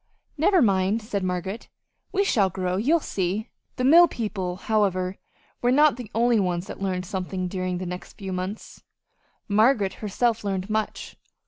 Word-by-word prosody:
"Never 345 +2 +4
mind," 195 0 +2
said 210 -2 -3
Margaret, 185 +4 -3 0.4
"we 400 0 +2
shall 210 - +2
grow. 185 0 -2
You'll 290 +12 +3
see!" 200 - -2 0.3
The 255 - -2
mill 335 +6 +8
people, 195 - -3
however, 190 -2 0 0.4
were 245 - +3
not 295 +1 +5
the 245 -4 -8
only 235 0 +3
ones 180 -2 -1
that - - -9
learned 185 -2 -2
something 185 0 -3
during 185 -1 -2
the 185 - -5
next 180 +1 -7
few 195 -2 -6
months. 185 +4 -6 0.7
Margaret 215 -1 +3
herself 225 +2 0
learned 195 0 -3
much. 215 0 -3
200 Hz, 155 wpm, -25 LUFS, 185-235 Hz, 0.7 s, mill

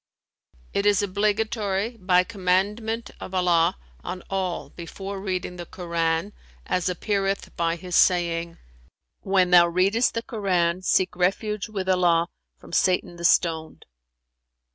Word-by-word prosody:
"It 200 +1 +1
is 205 0 +3
obligatory 210 +1 -1
by 185 -3 +3
commandment 210 +3 -1
of 190 - -7
Allah 175 0 +3 0.3
on 180 0 -6
all 190 -2 -2
before 195 +3 -7
reading 185 -2 -3
the 175 -1 -7
Koran, 170 +2 -2 0.3
as 180 0 0
appeareth 195 +2 -2
by 170 0 0
His 180 +1 -5
saying, 170 -2 +2 0.6
'When 190 -2 +2
thou 175 -1 +7
readest 195 +7 +2
the 230 - -2
Koran, 185 -6 0
seek 185 0 +1
refuge 200 +4 -1
with 195 -3 -4
Allah 175 -2 +3 0.3
from - - -15
Satan 180 -2 +1
the 170 - -9
Stoned.'" 160 -2 +1
185 Hz, 125 wpm, -24 LUFS, 175-200 Hz, 0.6 s, thou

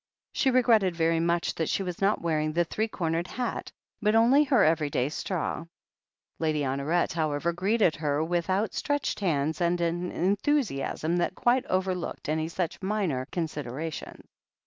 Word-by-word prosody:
She 270 - +2
regretted 230 -8 +4
very 165 0 +2
much 170 +1 +1
that 160 - -2
she 195 - 0
was 180 -1 -5
not 200 -1 +2
wearing 155 -2 0
the 175 +2 +3
three 220 +6 -1
cornered 170 -4 -2
hat, 250 +5 -4 0.3
but 210 0 +2
only 245 +6 +6
her 260 -5 +4
every 155 -2 +2
day 130 -1 0
straw. 165 0 -3 0.7
Lady 155 -2 0
Honoret, 140 +6 0
however, 160 0 0
greeted 190 0 +2
her 150 -1 0
with 170 +2 -1
out 200 +4 +1
stretched 290 -1 -1
hands 155 -4 0
and 175 0 +2
an 175 +1 -1
enthusiasm 190 - 0
that 175 +1 0
quite 250 +2 +2
over 185 0 +1
looked 180 -4 -5
any 155 +1 0
such 170 +2 -3
minor 190 -10 -1
considerations. 155 -2 -5
170 Hz, 160 wpm, -27 LUFS, 155-200 Hz, 0.7 s, only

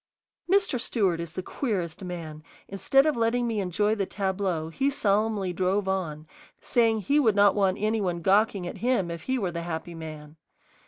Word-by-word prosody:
Mr. 395 - +3
Stewart 195 -9 +1
is 170 -1 -6
the 185 - -4
queerest 190 - -3
man: 165 -4 -6 0.3
instead 270 +8 +2
of 310 - +2
letting 235 +1 +1
me 225 -3 -1
enjoy 205 +3 +1
the 200 -3 -1
tableau, 190 -5 -2
he 270 +12 0
solemnly 210 -6 0
drove 190 +3 0
on, 165 -6 -2 0.3
saying 225 -2 +2
he 280 +8 +2
would 225 -8 +3
not 205 -1 +5
want 195 -2 +1
any 215 +1 0
one 175 -3 -2
gawking 200 0 +2
at 175 - -6
him 235 -8 +1
if 170 -1 -6
he 260 0 0
were 190 -7 -1
the 170 0 -4
happy 170 0 -5
man. 155 -1 -9
195 Hz, 180 wpm, -26 LUFS, 175-225 Hz, 0.3 s, not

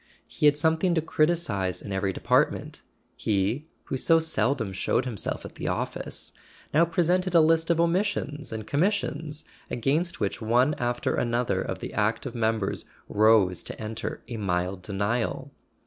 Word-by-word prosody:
He 150 - +1
had 145 0 +4
something 160 +3 +2
to 160 - +2
criticize 155 - 0
in 100 - -8
every 95 0 0
de¬ - - -9
partment. - - +1 0.4
He, 110 +9 0 0.2
who 135 - -3
so 165 +5 +5
seldom 125 -9 0
showed 95 +6 0
himself 115 -6 -4
at - - -9
the - - -5
office, - - -3 0.4
now 160 +3 +5
presented 180 +2 +1
a - - +9
list 165 +1 +3
of 170 -1 +3
omissions 170 -4 0
and 110 -1 -5
commis¬ 175 - +2
sions 155 -5 -4 0.2
against 150 +8 0
which 105 +3 -2
one 120 +6 +3
after 120 0 0
another 120 0 0
of - - -4
the - - -6
active 115 +4 0
members 110 -3 -1 0.2
rose 105 -4 +4
to - - -8
enter 110 +1 -5
a 120 -1 -5
mild 90 -2 -1
denial. 105 +4 -2
125 Hz, 160 wpm, -27 LUFS, 105-160 Hz, 0.4 s, a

